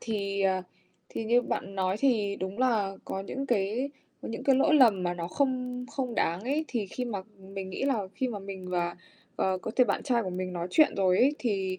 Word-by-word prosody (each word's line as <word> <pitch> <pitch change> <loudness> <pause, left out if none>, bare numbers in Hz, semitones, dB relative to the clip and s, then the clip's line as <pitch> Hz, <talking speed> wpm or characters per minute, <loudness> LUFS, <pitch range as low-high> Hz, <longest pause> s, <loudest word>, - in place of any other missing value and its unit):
thì, 200 -3 -2
ờ, 190 -1 +2 0.5
thì 225 - -4
như 240 +2 +4
bạn 195 -4 -3
nói 190 0 +1
thì 215 -6 +2
đúng 190 +3 -5
là 215 -7 +2
có 190 - -3
những 270 +7 -4
cái 235 +4 0 0.3
những 225 - -5
cái 270 -2 +5
lỗi 285 +3 +4
lầm 225 -10 +6
mà 175 0 0
nó 170 -1 -4
không 250 +1 -1
không 255 -4 -3
đáng 170 -3 +1
ấy 280 +8 0
thì 230 -5 -1
khi 250 +6 -4
mà 210 -6 -3 0.3
mình 190 -1 -5
nghĩ 185 - -4
là 225 -9 0
khi 260 - -1
mà 215 -4 -4
mình 190 -2 -7
và, 175 -1 -1 0.4
ờ, 190 -1 +1
có 225 - -5
thể 250 - +7
bạn - - 0
trai 245 -4 +2
của 185 - -3
mình 185 0 -3
nói 175 0 -3
chuyện 310 - +5
rồi 185 -2 +3
ấy, 280 +4 +5
thì 190 -5 -1
205 Hz, 225 wpm, -29 LUFS, 190-250 Hz, 0.5 s, thể